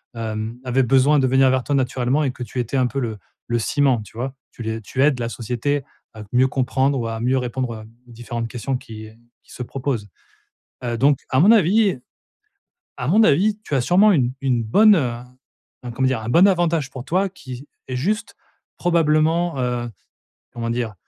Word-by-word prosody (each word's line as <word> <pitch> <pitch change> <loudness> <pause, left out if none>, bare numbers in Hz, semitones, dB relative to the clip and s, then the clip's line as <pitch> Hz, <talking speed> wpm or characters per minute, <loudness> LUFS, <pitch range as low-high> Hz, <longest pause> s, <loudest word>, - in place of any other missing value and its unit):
hem, 110 0 -4
avaient 130 +1 +1
besoin 135 +4 +4
de 130 - +2
venir 130 +1 +4
vers 130 -1 +1
toi, 145 - 0
naturellement 130 +2 0
et 135 - 0
que 125 - -7
tu 125 - -6
étais 120 +3 -2
un 130 -1 +2
peu 135 - -3
le 115 -4 -3 0.3
le 120 - 0
ciment, 135 +1 +1
tu 105 - -17
vois? 130 +3 -4 0.2
Tu - - -12
les 110 0 -3
tu 120 +5 -3
aides 140 -3 +2
la 115 - -2
société 125 +5 -2 0.3
à 110 -1 -9
mieux 130 +1 +4
comprendre 135 +1 0
ou 115 - -2
à 115 0 -4
mieux 125 +3 +1
répondre, 125 -1 -3
heu, 110 - -9 0.2
aux - - -15
différentes 120 0 -5
questions 125 +3 -3
qui, 110 -3 -10
heu, 110 - -16 0.3
qui - - -21
se 125 - -5
proposent, 125 -4 -3 0.8
heu, 120 -1 -2
donc 140 +2 +3
à 130 - +2
mon 190 +8 +6
avis 205 - +4 1.0
à 125 - -4
mon 210 +8 +5
avis, 205 +6 +3
tu - - -3
as 135 - +2
sûrement 185 +11 +4
une 125 -8 +1
une 125 -4 0
bonne, 210 - +5
heu, 130 -7 0 0.7
un 125 - -5
comment 130 +2 +1
dire? 130 -3 -1
Un 110 - -6
bon 175 +9 +6
avantage 170 -6 +1
pour 130 -2 -8
toi 185 +8 0
qui 130 -7 -10 0.2
est, 130 - -3
juste, 210 - -2 0.4
probablement, 165 -1 +2
heu, 120 -1 -2 0.6
comment 115 -1 -4
dire? 115 -2 -2
130 Hz, 200 wpm, -21 LUFS, 120-150 Hz, 1.0 s, mon